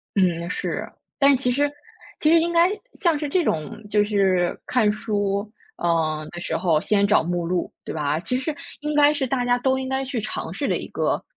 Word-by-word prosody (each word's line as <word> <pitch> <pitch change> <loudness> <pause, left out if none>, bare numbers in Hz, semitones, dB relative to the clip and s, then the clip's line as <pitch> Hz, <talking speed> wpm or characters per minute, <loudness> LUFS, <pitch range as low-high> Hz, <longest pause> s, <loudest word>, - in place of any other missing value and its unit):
嗯， 175 -3 +2
是， - - -3 0.3
但 280 -1 +5
其 250 -1 0
实 285 +3 +1 0.5
其 305 - +3
实 330 +1 +6
应 340 +1 0
该 340 +1 +5 0.2
像 340 -6 +1
是 295 0 -3
这 350 +5 +1
种， 160 - -2
就 210 0 +3
是 190 -4 +1
看 220 -5 +3
书， 205 -1 -2 0.3
嗯， 155 -2 0
的 175 - -8
时 175 - -3
候 165 -3 +2
先 200 +3 +2
找 205 -5 +4
目 175 0 -2
录 180 -1 -2
对 - - -6
吧？ 150 0 0
其 250 +9 -2
实 290 +3 -3 0.3
应 300 0 -2
该 295 0 +6
是 290 -3 -1
大 255 0 0
家 245 0 +2
都 265 +1 +1
应 260 0 -4
该 265 0 -1
去 250 -4 -3
尝 - - -4
试 - - -2
的 - - +1
一 - - -6
个 - - -1
215 Hz, 225 characters per minute, -23 LUFS, 175-275 Hz, 0.5 s, 实